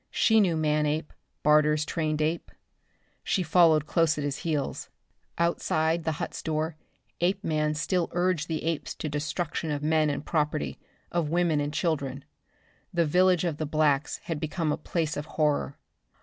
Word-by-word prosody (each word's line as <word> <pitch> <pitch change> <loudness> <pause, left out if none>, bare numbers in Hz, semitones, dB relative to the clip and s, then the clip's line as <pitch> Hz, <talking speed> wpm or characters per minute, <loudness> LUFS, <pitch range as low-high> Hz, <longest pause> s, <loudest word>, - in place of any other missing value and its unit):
She 220 -1 +4
knew 175 -5 +2
Manape, 150 0 0 0.3
Barter's 150 0 +4
trained 155 -1 -1
ape. 160 +2 -1 0.7
She 190 - 0
followed 160 -2 +4
close 160 0 +2
at 145 - -2
his 145 -1 -2
heels. 150 -5 -3 0.5
Outside 165 -1 +1
the 160 - +1
hut's - - -5
door 160 0 -2 0.5
Apeman 160 -5 +1
still 175 +3 0
urged 175 -3 +1
the 160 -2 -3
apes 150 -5 -2
to - - -4
destruction 155 +2 -3
of 145 -1 -2
men 155 0 +3
and 145 0 -3
property, 150 - -1 0.3
of 170 -3 0
women 170 -2 +2
and 145 0 -2
children. 140 -5 -2 0.7
The 170 -1 +2
village 180 +2 +3
of 165 -4 -1
the 155 - -3
blacks 150 -1 +1
had 165 -3 -3
become 155 0 -1
a - - +1
place 160 0 -2
of 150 +1 -5
horror. 150 -2 +1
155 Hz, 155 wpm, -27 LUFS, 150-170 Hz, 0.7 s, She